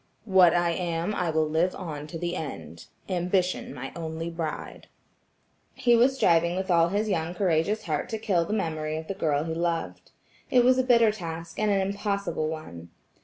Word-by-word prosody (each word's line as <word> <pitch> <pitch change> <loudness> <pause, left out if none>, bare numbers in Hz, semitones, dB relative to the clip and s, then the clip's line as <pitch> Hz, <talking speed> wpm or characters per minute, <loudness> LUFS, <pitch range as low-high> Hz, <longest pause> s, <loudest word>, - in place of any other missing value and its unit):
"What 185 -4 +5
I 175 -1 +2
am 170 +2 -2
I 180 -4 -1
will 160 -1 +1
live 165 +4 +1
on 150 -4 -6
to 165 - -6
the 175 +1 -3
end–Ambition 175 - -3
my 135 0 -7
only 165 0 -4
bride." 165 -2 -5 0.9
He 240 -1 +4
was 250 +3 +4
striving 170 -7 +3
with 190 0 -2
all 170 -1 +4
his 205 +3 0
young 175 -3 -1
courageous 185 +3 +1
heart 155 -3 -2
to 220 - -2
kill 195 -6 +1
the 165 - -6
memory 155 -6 -2
of 160 - -6
the - - -2
girl 150 -5 0
he 160 0 -3
loved. 170 0 -3 0.4
It 250 -1 +5
was 255 +1 +5
a - - +3
bitter 235 -3 +5
task, 165 -4 -7
and 215 0 +2
an 200 -1 +2
impossible 200 -4 -2
one. 85 - -8
170 Hz, 180 wpm, -27 LUFS, 160-200 Hz, 0.9 s, What